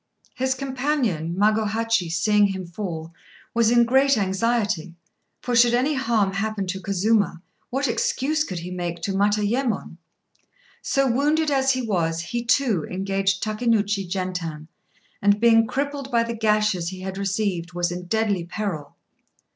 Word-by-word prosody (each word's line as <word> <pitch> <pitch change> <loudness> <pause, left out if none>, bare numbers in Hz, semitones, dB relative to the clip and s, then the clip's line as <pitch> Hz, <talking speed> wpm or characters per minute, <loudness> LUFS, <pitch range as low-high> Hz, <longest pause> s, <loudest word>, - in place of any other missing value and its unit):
His 260 0 0
companion 255 - -1
Magohachi, 215 -1 +1
seeing 205 +4 +3
him 190 -2 -4
fall, 170 -3 -6 0.4
was 230 -1 +3
in 240 0 +5
great 265 +2 +4
anxiety; 195 -3 0 0.5
for 245 - -1
should 240 0 +5
any 265 +5 +1
harm 225 -7 +1
happen 205 0 -2
to 190 +1 -4
Kazuma, 200 -2 +1 0.3
what 275 +2 0
excuse 265 +6 0
could 185 - -5
he 175 +2 -6
make 175 -2 -4
to 195 - -1
Matayémon? 210 +1 0 0.8
So, 275 0 +1
wounded 295 +5 +2
as 270 -1 +3
he 255 -1 -2
was, 170 -7 0
he 235 +7 -3
too 230 - +2
engaged 195 +1 -1
Takénouchi 210 -3 0
Gentan, 180 -4 -4 0.5
and, 205 +1 +3
being 225 0 +5
crippled 280 +2 -3
by 235 -3 +2
the 235 0 -4
gashes 210 -5 +1
he 185 0 -8
had 190 +1 -5
received, 195 -3 -2
was 175 0 -1
in 180 0 -6
deadly 210 -3 0
peril. 170 -6 -5
210 Hz, 145 wpm, -23 LUFS, 185-235 Hz, 0.8 s, in